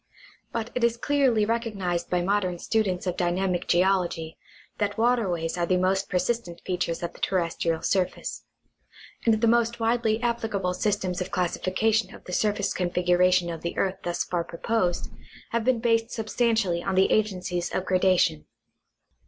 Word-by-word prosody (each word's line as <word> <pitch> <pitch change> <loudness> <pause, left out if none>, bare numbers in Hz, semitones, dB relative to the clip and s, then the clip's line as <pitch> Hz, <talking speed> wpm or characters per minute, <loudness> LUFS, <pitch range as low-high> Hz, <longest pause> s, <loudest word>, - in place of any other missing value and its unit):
But 230 0 -3
it 250 - -2
is 235 0 +2
clearly 260 -5 +2
recognized 210 -6 -2
by 180 -1 +1
modern 185 -2 0
students 195 -2 0
of 180 -2 -1
dynamic 180 0 0
geol 185 +2 +3
ogy 160 -1 -7 0.4
that 205 -1 -1
waterways 195 -9 +1
are 170 - +1
the 185 - +2
most 190 +2 +1
persistent 180 -2 -1
features 175 -2 -2
of 170 - -3
the - - -15
terrestrial 170 -3 -1
surface; 185 -2 -1 0.8
and 225 -2 +4
the 230 - +3
most 235 0 +2
widely 225 -1 +1
applicable 220 -6 -1
systems 190 -2 -1
of 180 - -3
classification 185 +4 0
of - - -15
the 180 - -8
surface 205 +1 +1
configuration 180 0 +2
of 165 - -6
the 170 - -4
earth 190 0 0
thus 175 0 -1
far 175 -1 -2
proposed 175 +1 -1 0.4
have 235 -1 0
been 255 +1 +3
based 230 0 +1
substantially 220 -6 0
on 195 +1 -2
the 190 +1 +4
agencies 180 -4 0
of 185 - -2
grada 185 0 +3
tion. 75 0 +1
190 Hz, 160 wpm, -26 LUFS, 180-225 Hz, 0.8 s, and